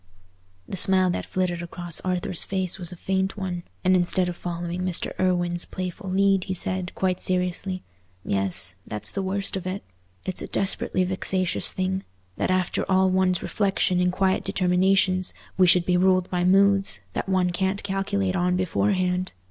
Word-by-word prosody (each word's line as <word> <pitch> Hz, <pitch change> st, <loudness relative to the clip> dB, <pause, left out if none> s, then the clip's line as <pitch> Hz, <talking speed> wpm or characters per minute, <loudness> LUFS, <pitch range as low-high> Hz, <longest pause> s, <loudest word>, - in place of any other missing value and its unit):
The 190 Hz, -, -5 dB
smile 185 Hz, 0 st, +5 dB
that -, -, -4 dB
flitted 180 Hz, -2 st, -1 dB
across 175 Hz, -1 st, -4 dB
Arthur's 180 Hz, -1 st, -1 dB
face 190 Hz, -1 st, -1 dB
was 175 Hz, -1 st, -4 dB
a -, -, -7 dB
faint 190 Hz, +3 st, -1 dB
one, 185 Hz, -3 st, -3 dB, 0.2 s
and 185 Hz, 0 st, +4 dB
instead 180 Hz, 0 st, +1 dB
of 175 Hz, -, -5 dB
following 175 Hz, 0 st, -4 dB
Mr. 185 Hz, -2 st, -1 dB
Irwine's 175 Hz, -2 st, +1 dB
playful 185 Hz, +1 st, -5 dB
lead, 195 Hz, 0 st, +2 dB
he 190 Hz, -, -2 dB
said, 185 Hz, 0 st, -1 dB
quite 185 Hz, -1 st, 0 dB
seriously—"Yes, 95 Hz, -, -1 dB
that's 105 Hz, 0 st, -2 dB
the 195 Hz, -, -2 dB
worst 195 Hz, +1 st, -2 dB
of 185 Hz, -1 st, -4 dB
it. 190 Hz, +2 st, -4 dB, 0.4 s
It's 185 Hz, -, -3 dB
a -, -, -5 dB
desperately 190 Hz, -1 st, +1 dB
vexatious 185 Hz, 0 st, +1 dB
thing, 190 Hz, +1 st, -2 dB, 0.3 s
that -, -, -1 dB
after 185 Hz, -1 st, 0 dB
all 190 Hz, 0 st, +4 dB
one's 185 Hz, -1 st, +2 dB
reflections 195 Hz, -3 st, +1 dB
and 180 Hz, 0 st, +2 dB
quiet 190 Hz, +1 st, +1 dB
determinations, 185 Hz, 0 st, +2 dB, 0.2 s
we 185 Hz, -1 st, +5 dB
should 175 Hz, 0 st, +5 dB
be 180 Hz, -1 st, +2 dB
ruled 185 Hz, 0 st, +2 dB
by 180 Hz, -1 st, 0 dB
moods 195 Hz, +1 st, +3 dB
that -, -, -3 dB
one 185 Hz, -1 st, +2 dB
can't 190 Hz, +3 st, -1 dB
calculate 195 Hz, -1 st, -1 dB
on 180 Hz, 0 st, +1 dB
beforehand. 185 Hz, 0 st, 0 dB
185 Hz, 165 wpm, -25 LUFS, 180-190 Hz, 0.4 s, smile